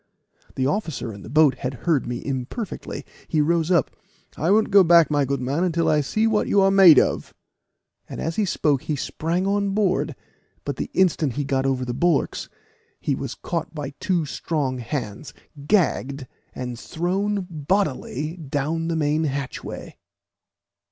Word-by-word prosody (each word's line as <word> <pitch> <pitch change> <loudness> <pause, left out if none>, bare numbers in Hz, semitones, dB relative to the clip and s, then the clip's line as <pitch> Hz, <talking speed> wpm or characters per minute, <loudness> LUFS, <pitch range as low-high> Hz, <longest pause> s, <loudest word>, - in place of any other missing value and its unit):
The 130 - 0
officer 145 - -2
in 100 - -10
the 105 - -10
boat 145 -2 +4
had 130 +1 -3
heard 155 -8 +2
me 120 0 -5
imperfectly; 140 - -5 0.2
he 155 - 0
rose 165 +2 +2
up 170 -8 +2 0.4
"I 160 +5 -1
won't 215 +2 +3
go 195 -1 +8
back, 170 -3 +5
my 145 -2 +2
good 135 0 -2
man, 140 +7 0
until 170 -2 +1
I 150 -1 +3
see 215 +10 0
what 220 -2 +2
you 200 - +3
are 195 0 +5
made 190 -6 +8
of;" - - +1 0.7
and - - -7
as 165 0 -2
he 215 - +1
spoke 150 -6 +1
he 150 - -2
sprang 165 +6 -2
on 200 0 0
board, 200 -3 +1 0.5
but - - -3
the - - -3
instant 165 -7 +2
he 145 - -2
got 135 -1 0
over 130 -1 0
the 120 - -3
bulwarks, 165 +3 0 0.5
he - - -1
was - - -4
caught 165 -1 -4
by 145 -2 -4
two 175 -4 0
strong 140 -3 -2
hands, 120 -1 -5 0.3
gagged, 140 -8 +1 0.3
and 125 -2 -5
thrown 195 +6 -1
bodily 155 -2 -2
down 155 +2 -2
the 165 - -1
main 155 0 +1
hatchway. 140 -2 -5
155 Hz, 165 wpm, -23 LUFS, 135-180 Hz, 0.7 s, go